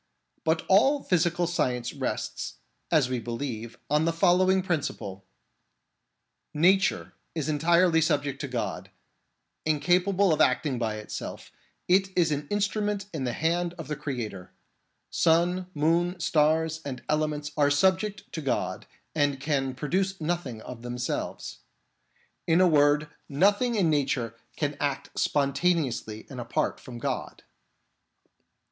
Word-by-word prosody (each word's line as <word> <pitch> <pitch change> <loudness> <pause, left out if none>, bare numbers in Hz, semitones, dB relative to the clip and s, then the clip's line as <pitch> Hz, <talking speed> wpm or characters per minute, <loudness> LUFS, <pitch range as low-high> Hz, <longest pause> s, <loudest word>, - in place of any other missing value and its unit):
But 160 0 +1
all 270 +9 +4
physical 175 0 +2
science 125 -8 -1
rests, - - -3 0.3
as 155 -6 +3
we 125 -1 -2
believe, 115 0 -5
on 150 +2 +2
the 165 - +2
following 185 +2 +3
principle: 120 - -3 1.3
Nature 185 +5 +3 0.2
is 155 -4 -2
entirely 165 +2 +3
subject 145 -3 0
to 140 - -3
God; 125 -3 -4 0.7
incapable 180 +5 +3
of - - +1
acting 130 0 +2
by 110 -2 -1
itself, 105 0 -7 0.4
it 190 +2 +4
is 165 -3 +3
an 145 0 -2
instrument 205 0 0
in 140 -5 -2
the 120 - -1
hand 170 +3 0
of 165 - -7
the 150 - -1
Creator; 120 -11 -5 0.6
sun, 175 +3 +2
moon, 170 +4 +1
stars, 160 0 +2
and 130 -3 -6
elements 150 -1 -1
are 145 -2 +3
subject 190 +7 +2
to 160 - -4
God 135 - -2 0.3
and 145 -3 +1
can 135 -2 -1
produce 190 +8 -1
nothing 155 -9 -3
of 125 -2 -8
themselves. 120 0 -4 0.9
In 165 +1 +4
a 185 - +6
word, 150 -1 +4 0.2
nothing 205 - +3
in 180 -7 +3
nature 135 -6 0 0.2
can 145 -1 -1
act 140 -2 -2
sponta 145 +5 +2
neously 115 -8 -3
and 130 -3 -7
apart 115 - -1
from 125 -2 -9
God. 120 - -4
155 Hz, 130 wpm, -27 LUFS, 135-175 Hz, 1.3 s, a